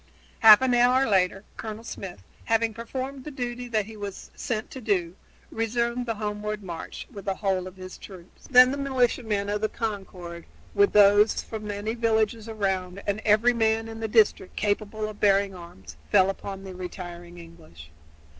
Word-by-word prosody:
Half 220 +2 +9
an 255 -1 +2
hour 250 +2 +4
later 195 -1 +2
Colonel 220 0 -6
Smith, 190 - -8 0.2
having 225 0 +1
performed 260 +4 -6
the 300 - -6
duty 245 -3 -5
that 215 -4 0
he 220 +1 -11
was 205 -2 -8
sent 220 -2 -4
to 260 - -8
do, 185 -6 0 0.4
resumed 235 +2 -1
the 230 - -1
homeward 210 0 -4
march 170 -3 -7
with 200 - -10
the 195 -1 -1
whole 190 -2 -1
of 185 - -11
his 185 0 -10
troops. 185 -3 -13
Then 255 0 +8
the 280 - -3
militiamen 245 -6 0
of 210 +1 -1
Concord, 190 -6 -5 0.3
with 200 - +3
those 205 +1 +5
from 215 -1 -7
many 205 +2 -3
villages 225 -1 0
around 195 -3 -2
and 205 +1 -1
every 220 +3 +4
man 225 -1 +1
in 225 0 -8
the 225 - -2
district 215 -4 +2
capable 215 +1 -1
of 215 -1 -9
bearing 200 -1 +3
arms, 95 - -12
fell 185 - +5
upon 195 0 -8
the 190 -1 -8
retiring 175 -1 -8
English. 160 - -14
210 Hz, 170 wpm, -26 LUFS, 190-225 Hz, 0.4 s, Half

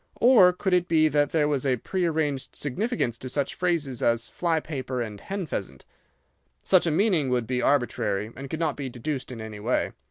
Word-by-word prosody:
Or 230 -7 +7
could 185 +1 -2
it 180 -1 +3
be 155 -1 +4
that 145 0 +2
there 155 -2 +2
was 145 -3 0
a 130 -2 +1
prearranged 160 -3 -1
significance 145 - -2
to 130 - -6
such 140 +2 -1
phrases 160 -9 -1
as 115 0 +1
'fly 165 -2 0
paper' 130 -5 -4
and 110 -4 -4
'hen 195 -2 -4
pheasant'? 95 - -6 0.8
Such 185 -2 +4
a - - +3
meaning 165 -5 +2
would 125 -2 0
be 125 +2 -1
arbitrary 110 -6 0
and 135 0 -8
could 160 - -4
not 160 -3 0
be 140 -2 -5
deduced 130 +2 -4
in 120 - -7
any 110 -1 -7
way. 120 +5 0
145 Hz, 195 wpm, -26 LUFS, 125-170 Hz, 0.8 s, Or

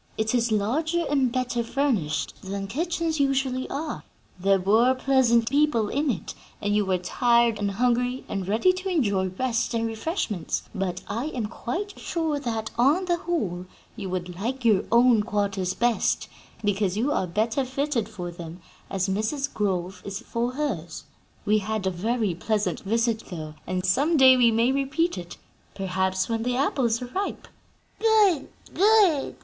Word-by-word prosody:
It 220 +1 0
is 235 -2 +1
larger 310 +12 +1
and 265 -4 +2
better 245 -1 -1
furnished 230 - -1
than 195 +1 -4
kitchens 325 - -2
usually 270 -2 0
are, 300 +2 -4 0.4
there 195 +1 +3
were 225 +7 +4
pleasant 255 -3 +3
people 280 -6 +2
in 285 +2 0
it, 205 -8 -3 0.3
and 205 0 0
you 210 -2 +1
were 185 -1 +2
tired 235 +4 +2
and 205 -1 0
hungry 245 +4 0
and 195 -2 -4
ready 225 - +3
to 370 +1 -4
enjoy 205 - +1
rest 230 +5 -1
and 230 0 0
refreshments; 225 - -2
but 190 -4 -3
I 230 +6 -3
am 255 -7 -3
quite 355 - -5
sure 320 -4 -1
that, 225 -4 -3
on 295 +10 +4
the 350 -1 +1
whole, 205 - -3 0.3
you 200 -4 -5
would 180 -1 -4
like 250 +3 -3
your 215 -4 +4
own 235 -1 +5
quarters 200 -3 -1
best, 240 -2 +1 0.4
because 205 -2 0
you 255 +7 +1
are 190 - 0
better 225 +9 0
fitted 260 -3 -1
for 180 -5 -6
them, 170 0 -9 0.3
as 190 0 -1
Mrs. 220 +9 -1
Grove 185 -2 -2
is 200 -1 -5
for 240 +2 -2
hers. 210 - -3 0.4
We 215 0 +3
had 215 0 -3
a 190 - +1
very 215 +2 -1
pleasant 210 +4 -1
visit, 225 +2 0
though, 155 -4 -6
and 185 0 -2
some 285 - +2
day 260 -1 +8
we 245 -2 +5
may 230 +3 +2
repeat 275 +6 0
it 175 0 -9 0.4
perhaps 190 -1 -1
when 225 -1 -1
the 245 +1 -1
apples 255 -4 +1
are 245 - -8
ripe." 395 +2 -3 0.5
"Good! 420 -9 +4 0.3
good!" 395 -7 +4
230 Hz, 165 wpm, -25 LUFS, 195-275 Hz, 0.5 s, day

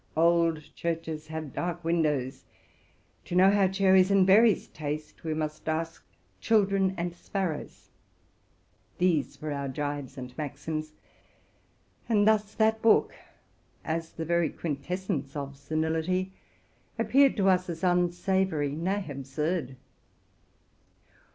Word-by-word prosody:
'* - - -15
Old 165 -1 +3
churches 160 -2 -4
have 155 -3 -6
dark 175 0 -3
windows: 150 -6 0 0.8
to 175 - -5
know 190 +2 +6
how 200 -1 +4
cherries 190 -1 +4
and 195 -2 +5
berries 210 +2 +5
taste, 150 0 -6
we 160 -1 -2
must 155 0 -4
ask 165 +1 -3 0.4
children 195 -3 +2
and 170 0 -2
sparrows.'' 175 -3 -5 1.1
These 165 -7 +1
were 155 - -3
our 140 -1 -3
gibes 145 0 -4
and 125 -1 -8
maxims; 155 +2 -5 1.2
and 210 -2 +3
thus 215 -1 +2
that 220 0 +2
book, 225 - +4 0.7
as 165 0 -3
the 165 - -5
very 170 -1 +2
quintessence 155 -1 -4
of 140 -1 -5
senility, 160 +5 -1 0.6
appeared 255 +5 +4
to 195 -2 +2
us 185 -1 +3
as 165 0 -6
unsavory, 175 -3 +1
nay, 185 +6 -2
absurd. 140 +1 -3
165 Hz, 120 wpm, -28 LUFS, 150-190 Hz, 1.2 s, know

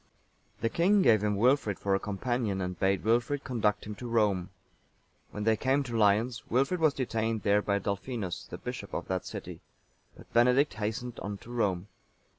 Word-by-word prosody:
The 115 - +1
king 190 - +3
gave 110 -3 +5
him 105 -1 +1
Wilfrid 115 -2 +2
for 100 - -1
a 95 - +2
companion, 105 0 -2
and 90 -1 -4
bade 95 0 +1
Wilfrid 120 +6 +1
conduct 105 -5 0
him 105 - -5
to 125 - -6
Rome. 105 -6 +1 0.8
When 105 - -5
they 110 +1 +3
came 135 +5 +1
to 120 -3 -5
Lyons, 110 +2 +2
Wilfrid 135 +9 +1
was 155 -3 +3
detained 115 -4 -1
there 105 0 +3
by 100 -1 0
Dalfinus,(897) 100 -1 -4
the - - -6
bishop - - -6
of - - -4
that - - -2
city; - - -7 0.6
but - - -16
Benedict 125 +5 +4
hastened 110 +3 -4
on 105 -1 -5
to 115 - -13
Rome. 100 -6 0
110 Hz, 180 wpm, -29 LUFS, 100-125 Hz, 0.8 s, gave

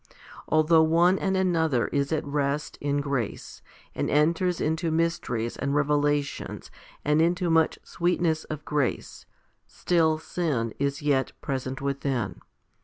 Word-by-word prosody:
Although 155 +1 +4
one 170 +4 +4
and 190 -1 0
another 160 -9 +2
is 140 0 -1
at 155 -1 -1
rest 145 +1 -1
in 145 0 0
grace, 140 -6 -4 0.3
and - - -2
enters 165 +4 +2
into 160 +2 0
mysteries 160 -8 -1
and 140 +1 -1
revelations 145 0 0 0.3
and 150 +2 +3
into 175 +1 +1
much 160 -1 +3
sweet 175 +1 -1
ness 160 -2 +1
of 155 0 -7
grace, 145 -4 -2 0.4
still 160 -3 +1
sin 150 -9 -2
is 140 +2 -1
yet 135 -3 +1
present 130 -1 -4
within. 140 -2 -2
150 Hz, 130 wpm, -26 LUFS, 140-165 Hz, 0.4 s, Although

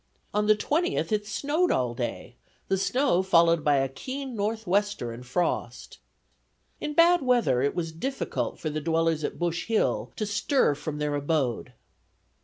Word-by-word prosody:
On 210 0 +1
the 215 - +6
20th, 330 - 0
it 210 -1 0
snowed 290 - 0
all 125 -2 +1
day, 120 0 -5 0.4
the 195 - +2
snow 245 -1 +2
followed 170 -3 +4
by 145 -1 +3
a 135 -1 +2
keen 260 - -6
northwester 205 - -1
and 115 +2 -9
frost. 125 +8 -3 0.8
In 300 - -4
bad 345 +1 +5
weather 240 - +2
it 140 +1 0
was 165 -2 -2
difficult 265 +12 -3
for 155 - -4
the 155 +1 -3
dwellers 165 0 +1
at - - -3
Bush 170 -1 -2
Hill 225 -1 0
to 215 - -2
stir 205 - +2
from 150 +1 -5
their 150 0 -1
abode. 145 -5 -1
175 Hz, 160 wpm, -27 LUFS, 150-230 Hz, 0.8 s, the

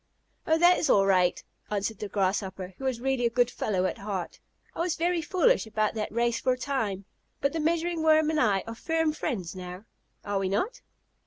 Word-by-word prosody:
"Oh, 320 - +4
that 350 +2 +5
is - - 0
all 195 -1 +5
right," 185 -2 +2 0.3
answered 210 +1 -2
the 210 - -4
Grasshopper, 190 -1 -1
who 270 - -5
was 255 -3 -1
really 265 0 0
a - - 0
good 245 +1 +2
fellow 190 -6 -1
at - - -2
heart; 195 -3 -4 0.4
"I - - -8
was 340 0 0
very 345 +1 0
foolish 370 - +2
about 215 -1 0
that 215 -1 -3
race 235 +1 +1
for 255 - +2
a - - -5
time, 225 -8 -2 0.3
but 280 0 0
the 325 - -1
Measuring 335 +1 0
Worm 315 0 +4
and 310 - 0
I 200 -8 +2
are 230 - -6
firm 325 +5 0
friends 195 - -3
now. 180 +2 -8 0.4
Are 205 -1 -1
we 190 -1 -1
not?" 430 - -1
235 Hz, 210 wpm, -28 LUFS, 195-315 Hz, 0.4 s, that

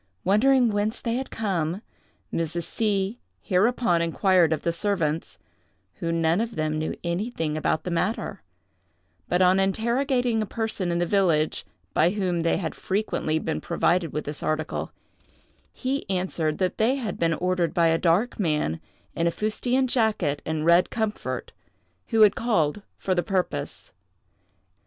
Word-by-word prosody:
Wondering 240 +5 +4
whence 205 +2 -1
they 230 - -2
had 260 +2 -3
come, 190 -3 -2 0.5
Mrs. 165 +1 -2
C—— 205 +2 -1 0.2
hereupon 195 -2 +2
inquired 170 0 +3
of 160 - -1
the 170 - 0
servants, 165 -4 -1 0.6
who 165 - -1
none 165 +3 +2
of 230 0 -3
them 155 0 -1
knew 155 - -2
anything 170 -3 -2
about 155 0 0
the 180 - -4
matter; 185 +6 -2 0.9
but 180 +1 +3
on 185 +1 +5
interrogating 235 +4 +1
a 215 - -2
person 220 -6 -2
in 170 - 0
the 175 - +1
village, 170 -5 +1 0.3
by 165 - +4
whom 185 -3 -1
they 165 - +2
had 165 -4 -3
frequently 190 -5 -1
been 160 0 -2
provided 170 -1 +1
with 150 - -3
this 150 0 -5
article, 155 0 -2 0.8
he 265 -3 -3
answered 180 -5 -1
that 185 -1 -1
they 230 +5 +3
had 235 -8 -4
been 165 -1 +2
ordered 180 -1 0
by 170 - +2
a 165 0 +2
dark 185 +9 +1
man, 150 - 0 0.3
in 170 - +1
a - - +2
fustian 245 +7 0
jacket 215 - +1
and 160 -1 -1
red 170 +1 +5
comfort, 220 -2 -3 0.6
who 225 -2 +2
had 210 -2 +7
called 210 -7 +1 0.2
for 190 - -1
the 175 - +2
purpose. 185 - -3
185 Hz, 150 wpm, -25 LUFS, 165-220 Hz, 0.9 s, had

